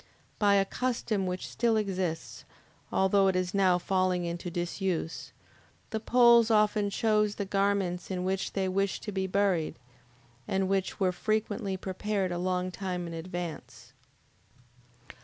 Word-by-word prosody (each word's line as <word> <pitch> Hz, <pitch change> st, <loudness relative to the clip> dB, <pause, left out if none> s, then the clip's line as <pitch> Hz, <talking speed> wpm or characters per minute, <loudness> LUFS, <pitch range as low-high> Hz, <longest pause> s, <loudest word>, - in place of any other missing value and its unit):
By 205 Hz, -1 st, +4 dB
a 195 Hz, -1 st, +4 dB
custom 225 Hz, -4 st, -1 dB
which 180 Hz, 0 st, -3 dB
still 235 Hz, -2 st, +1 dB
exists, 185 Hz, -6 st, -3 dB, 0.5 s
although 195 Hz, +1 st, +3 dB
it 190 Hz, -, +2 dB
is 185 Hz, 0 st, -1 dB
now 190 Hz, -3 st, +4 dB
falling 185 Hz, -1 st, 0 dB
into 170 Hz, +1 st, -4 dB
disuse, 175 Hz, -1 st, -3 dB, 0.6 s
the 220 Hz, -, -1 dB
Poles 235 Hz, 0 st, +5 dB
often 210 Hz, -1 st, +3 dB
chose 210 Hz, 0 st, +1 dB
the 200 Hz, -, -3 dB
garments 195 Hz, -2 st, 0 dB
in 180 Hz, -1 st, -2 dB
which 190 Hz, +1 st, -2 dB
they 190 Hz, -1 st, 0 dB
wished 195 Hz, +1 st, -1 dB
to 210 Hz, -, -4 dB
be 190 Hz, -1 st, -1 dB
buried, 190 Hz, -4 st, +1 dB, 0.7 s
and 190 Hz, 0 st, 0 dB
which 195 Hz, 0 st, -1 dB
were 190 Hz, -2 st, +2 dB
frequently 205 Hz, +1 st, -1 dB
prepared 190 Hz, 0 st, -2 dB
a 175 Hz, -, -2 dB
long 185 Hz, 0 st, -1 dB
time 180 Hz, -2 st, -4 dB
in 170 Hz, -, -6 dB
advance. 170 Hz, 0 st, -7 dB
190 Hz, 140 wpm, -29 LUFS, 180-205 Hz, 0.7 s, Poles